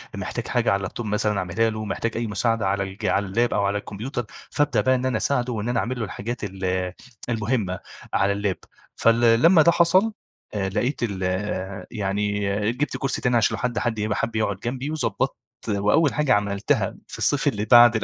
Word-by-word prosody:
محتاج - - -4
حاجة - - +1
على 100 - +3
اللاب 95 -2 -5
توب 120 - -5
مثلًا 105 -1 0
أعملها 95 +6 +1
له 110 0 -4
محتاج 115 +3 -2
أي 115 -1 -1
مساعدة 110 0 0
على 100 0 +1
الج 95 +3 -7
على 100 -1 +2
اللاب 115 +5 +1
أو 100 -1 +1
على 100 +1 0
الكمبيوتر 115 +5 -5 0.3
فابدأ 145 -7 +2
بقى 130 +4 +3
إن 130 +1 -2
أنا 125 -4 +1
أساعده 125 -2 0
وإن 110 +1 -3
أنا 120 - +1
أعمل 125 +1 -2
له 110 - -1
الحاجات 115 +5 -5
ال 95 -2 -2 0.4
المهمّة 110 -5 -1 0.3
على 100 +2 +3
اللاب. 100 -2 -1 0.4
فال 115 0 +4
لما 165 +1 +7
ده 170 - +6
حصل 185 +6 +3 0.4
لقيت 105 +7 -1
ال 95 -4 -2
آآ، 95 +1 -3
يعني 105 -1 -1 0.3
جبت 140 +5 -2
كرسي 135 - -1
تاني 125 -2 +2
عشان 110 0 +2
لو - - -7
حد 125 -1 0
حد 110 -2 -1
يبقى 105 0 -1
حب 115 - -2
يقعد 105 -3 0
جنبي 130 +5 -3
وضبطت 130 -10 -1 0.3
وأوّل 105 +9 +3
حاجة 150 -6 +2
عملتها 100 0 0
في - - -7
الصيف - - +2
اللي 105 +1 0
بعد 120 -1 +7
110 Hz, 195 wpm, -24 LUFS, 100-120 Hz, 0.4 s, لما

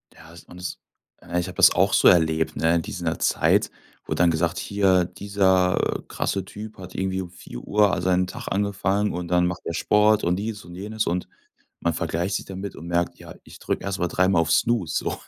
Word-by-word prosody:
Ja 80 0 -15
es 85 - -13
und 90 - -13
es 90 - -5 0.4
äh, 90 - -2
ich 90 - -3
habe 90 - -8
das - - +7
auch - - +2
so - - +5
erlebt, 80 -2 +3
ne? 80 +1 +2
In 85 - +1
dieser 80 0 -4
Zeit, - - +2 0.4
wurde - - -3
dann 85 -1 +4
gesagt: 85 0 0
„Hier, 95 -3 +2
dieser, 95 0 +1
äh, - - -10
krasse 95 - -2
Typ 105 +2 -9
hat 90 -1 -11
irgendwie 95 0 -1
um 90 - -8
4:00 100 +5 0
al - - -1
seinen 90 0 +2
Tag - - -8
angefangen 100 +1 0
und 90 0 -4
dann 90 0 +2
macht 90 0 -4
der - - -3
Sport 105 +4 +3
und 90 +1 +1
dies 105 +1 -5
und 85 0 -11
jenes“, 110 +3 -3
und 90 +1 -1 0.5
man 85 - +1
vergleicht 85 +4 -2
sich - - -3
damit 95 +1 -7
und 85 - -9
merkt: 85 0 -1
„Ja, 85 0 -11
ich - - -14
drücke - - -3
erst 100 0 -3
mal 90 - +1
dreimal 95 0 +2
auf 80 - -1
Snooze, 110 -9 +1
so.“ - - -1
90 Hz, 220 wpm, -24 LUFS, 85-100 Hz, 0.5 s, das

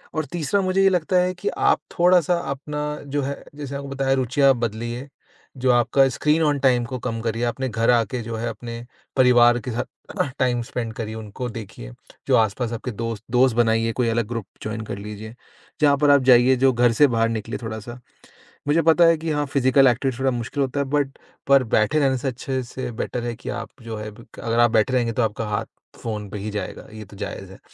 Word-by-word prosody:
और 155 -1 -1
तीसरा 175 +4 0
मुझे 185 +1 +2
ये 195 - +6
लगता 180 -1 0
है 180 0 0
कि 180 - -3
आप - - +2 0.2
थोड़ा-सा 180 -1 +4 0.2
अपना 150 +2 -4 0.2
जो 145 +1 -2
है 140 +1 -4
जैसे 145 -2 -7
मैंने - - -2
आपको 140 0 -7
बताया 135 -1 +1
रुचियाँ 135 +2 +3
बदलिए। 120 +3 -3 0.5
जो 130 - +4
आपका 125 +3 +4
स्क्रीन 150 +5 +1
ऑन 145 -2 +2
टाइम 125 -3 +3
को 130 +1 -5
कम 115 -2 -3
करिए, 115 +1 -2
अपने 130 +2 -2
घर 115 0 0
आके 120 +1 +1
जो 115 0 -5
है 115 - -3
अपने 115 0 -7 0.3
परिवार 120 -2 +5
के - - -1
साथ 115 - -2 0.3
अह, - - +1
टाइम 125 -2 +1
स्पेंड 115 -1 -4
करिए, 110 -1 -5
उनको 110 +3 -6
देखिए। 100 - -9 0.4
जो - - +4
आस-पास 110 +2 0
आपके 115 +2 -4
दोस्त, 115 -1 -5
दोस्त 125 -1 +4
बनाइए 115 -1 +2
कोई 120 -1 0
अलग 115 -1 0
ग्रुप 115 -3 -4 0.2
जॉइन 110 +1 -4
कर 100 - -5
लीजिए, 105 +2 -8 0.5
जहाँ 145 -2 +5
पर 145 +1 +3
आप 140 - +6
जाइए 125 +2 +6
जो 130 - +5
घर 120 0 +3
से 145 +6 +5
बाहर 115 -2 +1
निकले 115 0 -4
थोड़ा 110 -1 -4
सा। 120 +3 -9 0.7
मुझे 155 +3 +3
पता 165 +2 +5
है 165 0 +5
कि 160 +1 -3
हाँ, 145 -1 0
फिज़िकल 135 0 +4
एक्टिविटी 125 0 0
थोड़ा 135 0 +2
मुश्किल 125 +4 -3
होता 135 +1 -2
है 140 - +1
बट 140 -2 -2 0.3
पर 140 -1 +6
बैठे 135 +9 +3
रहने 135 -2 +2
से 130 - -4
अच्छे 130 +1 -3
से 125 +1 -6
बेटर 125 - -4
है 120 -1 -3
कि 115 - -8
आप - - -7
जो 115 -1 -6
है 105 0 -6
ब 115 +3 -15
अगर 115 0 -1
आप 120 -1 +5
बैठे 115 +2 +2
रहेंगे 120 -2 +1
तो 125 - 0
आपका 110 0 -2
हाथ 105 +2 -2 0.4
फ़ोन 105 -3 -4
पे 105 - -6
ही 105 +2 -4
जाएगा, 105 0 -5
ये 110 0 -8
तो 100 +1 -15
जायज 95 -2 -6
है। 95 - -13
120 Hz, 225 wpm, -23 LUFS, 115-140 Hz, 0.7 s, ये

